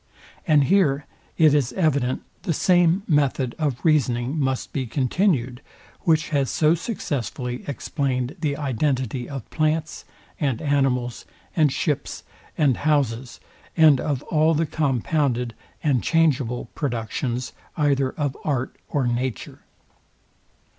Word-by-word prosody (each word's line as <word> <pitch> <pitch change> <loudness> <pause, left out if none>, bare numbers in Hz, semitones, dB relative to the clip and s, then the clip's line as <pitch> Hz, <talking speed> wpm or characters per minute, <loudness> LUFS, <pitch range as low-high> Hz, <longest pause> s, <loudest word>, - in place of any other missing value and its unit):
And 150 -3 +5
here 145 -4 +2 0.3
it 155 -3 +6
is 140 -5 +1
evident, 140 -8 +1 0.2
the 175 -2 -1
same 175 +2 +3
method 140 -5 +1
of 145 -4 -2
reasoning 130 -4 +2
must 130 -2 -1
be 130 -3 -2
continued 130 - 0 0.4
which 160 -2 +2
has 140 -4 +1
so 155 0 +3
successfully 130 - -3
explained 135 -1 -2
the 145 -3 -1
identity 130 -3 -1
of 135 -5 -6
plants, 155 0 -1 0.4
and 135 -7 0
animals, 135 -4 0 0.3
and 155 -4 +4
ships, 145 0 -2 0.3
and 140 -6 +3
houses, 135 -5 0 0.4
and 155 -5 +6
of 140 -4 -2
all 155 +1 +2
the 165 +2 +1
compounded 135 -4 0 0.3
and 135 -6 +2
changeable 140 -7 +1
productions 120 -2 -3 0.2
either 140 -3 +2
of 145 -3 -2
art 130 -4 -1
or 140 -3 0
nature. 120 -1 -3
140 Hz, 120 wpm, -23 LUFS, 125-155 Hz, 0.4 s, it